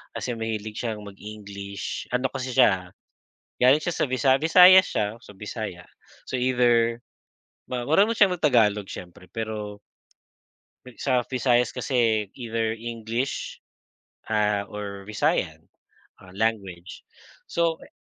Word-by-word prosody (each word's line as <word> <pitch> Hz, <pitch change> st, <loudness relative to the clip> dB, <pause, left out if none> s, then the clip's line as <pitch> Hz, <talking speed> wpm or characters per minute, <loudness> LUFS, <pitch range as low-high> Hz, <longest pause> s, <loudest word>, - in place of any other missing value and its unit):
kasi 125 Hz, -, -3 dB
mahilig 110 Hz, -1 st, -4 dB
siyang 110 Hz, -3 st, -3 dB
mag-English, 100 Hz, 0 st, -7 dB
ano 125 Hz, +2 st, +1 dB
kasi 130 Hz, -1 st, -4 dB
siya, 90 Hz, -5 st, +3 dB, 0.7 s
galing 135 Hz, +5 st, +6 dB
siya 175 Hz, -, -2 dB
sa -, -, 0 dB
Visa 130 Hz, +1 st, +3 dB
Visayas 180 Hz, +3 st, +8 dB
siya, 105 Hz, +1 st, -1 dB
so -, -, -13 dB
Bisaya. 105 Hz, -4 st, -6 dB, 0.4 s
So, -, -, -6 dB
either, 120 Hz, -2 st, +2 dB, 0.7 s
ma 125 Hz, -1 st, -2 dB
marunong 205 Hz, +8 st, +4 dB
siyang 195 Hz, -4 st, +5 dB
mag-tagalog 105 Hz, -, +2 dB
siyempre 90 Hz, +1 st, -10 dB
pero 105 Hz, -2 st, -5 dB, 1.2 s
sa 125 Hz, -3 st, +1 dB
Visayas 125 Hz, -1 st, +1 dB
kasi 115 Hz, -6 st, +1 dB
either 115 Hz, -2 st, -2 dB
English 115 Hz, +2 st, -4 dB, 0.7 s
ah, 105 Hz, -2 st, +1 dB
or 100 Hz, -1 st, -7 dB
Visayan 110 Hz, -, -1 dB, 0.7 s
language, 100 Hz, -5 st, -3 dB, 0.4 s
so 170 Hz, -1 st, 0 dB
kay -, -, -16 dB
115 Hz, 115 wpm, -25 LUFS, 105-125 Hz, 1.2 s, Visayas